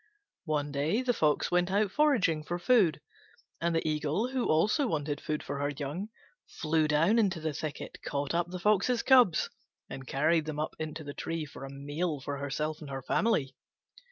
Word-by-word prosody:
One 150 -2 -1
day 155 - 0
the 250 -1 +2
Fox 155 -8 +1
went 180 0 +2
out 200 +1 +1
foraging 215 - +2
for 175 +3 -3
food, 185 - +3 0.6
and 170 0 +1
the 165 - 0
Eagle, 155 - 0
who 260 -2 -1
also 215 - +3
wanted 145 -6 -2
food 150 -1 -3
for 140 0 -4
her 145 0 0
young, 145 +8 -4 0.4
flew 155 -1 0
down 165 +10 +3
into 190 -6 +1
the 155 -1 -2
thicket, 150 +1 -6
caught 140 +1 -2
up 175 +1 0
the 180 - -5
Fox's 210 +5 +2
cubs, 245 - +5 0.4
and 130 -1 -7
carried 155 +3 +2
them 155 -1 -4
up 155 - -3
into 155 0 -5
the 145 -1 -7
tree 165 +1 -3
for 140 -1 -9
a - - -8
meal 145 +3 -3
for 140 +2 -4
herself 150 +3 -3
and 150 - -8
her 135 -1 -5
family. 150 - +1
155 Hz, 185 wpm, -30 LUFS, 145-190 Hz, 0.6 s, cubs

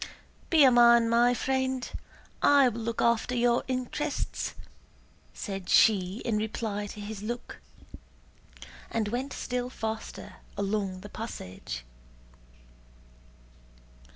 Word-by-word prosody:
"Be 320 -3 +6
a 265 - +7
man, 235 -1 +6
my 240 +1 +4
friend. 260 0 -1 0.5
I 285 -2 +6
will 230 0 -6
look 230 0 -2
after 235 +1 +2
your 240 0 +2
interests," 260 +3 -3 0.8
said 195 -4 -6
she 195 -1 +4
in 225 -3 +1
reply 210 -1 -3
to 210 - -9
his 205 0 -6
look, 240 +3 -6 1.3
and 220 -2 -1
went 255 +5 -3
still 250 -1 -3
faster 220 -3 -6 0.2
along 195 -2 -2
the 205 - -9
passage. 95 - -7
230 Hz, 105 wpm, -28 LUFS, 210-250 Hz, 1.3 s, a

